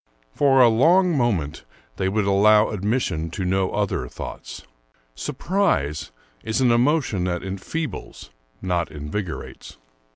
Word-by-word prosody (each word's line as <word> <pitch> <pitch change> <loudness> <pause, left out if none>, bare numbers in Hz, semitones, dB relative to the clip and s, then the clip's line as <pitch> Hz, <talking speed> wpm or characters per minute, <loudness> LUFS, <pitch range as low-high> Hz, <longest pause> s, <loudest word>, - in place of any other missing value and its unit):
For 135 -2 +4
a 125 - +8
long 170 +10 +4
time 90 -12 0 0.4
they 95 - 0
would 105 +1 0
allow 105 +2 +4
admis 105 +6 0
sion 80 -5 -3
to 95 +3 -4
no 95 +1 +1
other - - -2
thoughts. - - -8 0.5
Surprise 140 - -1 0.3
is 110 +4 -1
an 125 -2 +4
emotion 120 - +2
that 90 -1 -2
enfeebles, 100 - -6 0.3
not 90 -2 -1
invigorates. 80 +5 -6
105 Hz, 125 wpm, -23 LUFS, 90-130 Hz, 0.5 s, a